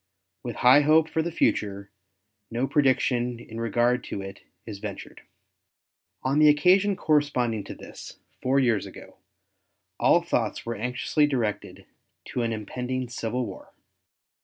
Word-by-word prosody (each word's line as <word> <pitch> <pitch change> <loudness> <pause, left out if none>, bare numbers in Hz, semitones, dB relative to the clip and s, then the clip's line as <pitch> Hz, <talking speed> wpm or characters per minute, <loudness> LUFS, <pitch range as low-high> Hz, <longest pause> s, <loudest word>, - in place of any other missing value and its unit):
With - - -6
high 130 +4 +8
hope 155 +2 +4
for 160 - -1
the 170 +2 -3
future, 100 -9 -1 0.6
no 120 +3 -1
prediction 125 -4 +1
in 115 -1 -8
regard 120 +2 +1
to - - -5
it 95 0 -8 0.3
is 105 -3 -8
ventured. - - -8 1.0
On 135 +3 +1
the 155 0 +7
occasion 185 +7 +4
corresponding 135 - +1
to - - -8
this, - - -11 0.2
four 135 +2 +2
years 120 -6 +1
ago, - - -13 0.8
all - - +4
thoughts - - -2
were 115 - -2
anxiously 125 +6 0
directed 120 -7 -3 0.4
to 125 - -2
an 115 -1 -1
impending 125 +4 -4
civil 120 +1 -3
war. 95 -4 -10
125 Hz, 135 wpm, -26 LUFS, 115-145 Hz, 1.0 s, high